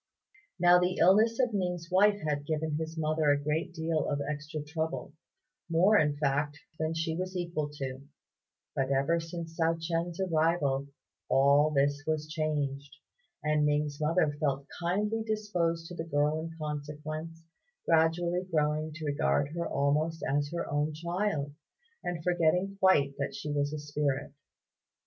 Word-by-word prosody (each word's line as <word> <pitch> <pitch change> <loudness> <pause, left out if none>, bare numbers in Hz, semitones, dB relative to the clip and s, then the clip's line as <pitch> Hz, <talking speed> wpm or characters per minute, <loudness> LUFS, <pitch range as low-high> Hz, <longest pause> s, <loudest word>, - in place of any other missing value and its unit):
Now 175 0 +7
the 180 +1 +1
illness 220 +6 +5
of 250 -3 +2
Ning's 180 -4 -2
wife 205 +2 +4
had 145 -1 -1
given 155 0 -1
his 160 +1 -4
mother 155 -1 +1
a 145 - +5
great 150 +4 -1
deal 160 -2 -1
of 145 - 0
extra 150 +1 -4
trouble 150 -3 -4 0.6
more, 180 +6 +4
in 150 -1 +1
fact, 145 0 0 0.2
than 160 +1 -1
she 160 0 -1
was 185 +1 -3
equal 170 -4 -2
to; 135 -2 -5 0.7
but 135 -1 0
ever 140 +5 +2
since 165 0 -6
Hsiao 165 0 +1
ch'ien's 165 +1 -2
arrival 160 -6 +1 0.4
all 140 +3 +5
this 145 0 +1
was 155 -1 -1
changed, 145 -4 -2 0.5
and 150 0 +2
Ning's 150 0 0
mother 155 -1 +2
felt 140 -2 0
kindly 205 +6 0
disposed 200 -7 -1
to - - -7
the 160 - -4
girl 150 +1 +2
in 165 0 -7
consequence, 155 +2 -5 0.4
gradually 170 +2 +2
growing 155 0 +1
to 160 0 -7
regard 145 0 +1
her 170 0 -2
almost 150 +4 0
as 145 +1 0
her 170 0 -3
own 145 +1 0
child, 170 -3 -2 0.5
and 175 -2 -3
forgetting 180 +3 +2
quite 145 -8 +4
that 140 - -2
she 150 - -4
was 145 0 0
a 155 - -3
spirit. 145 -2 -2
155 Hz, 150 wpm, -30 LUFS, 145-170 Hz, 0.7 s, Now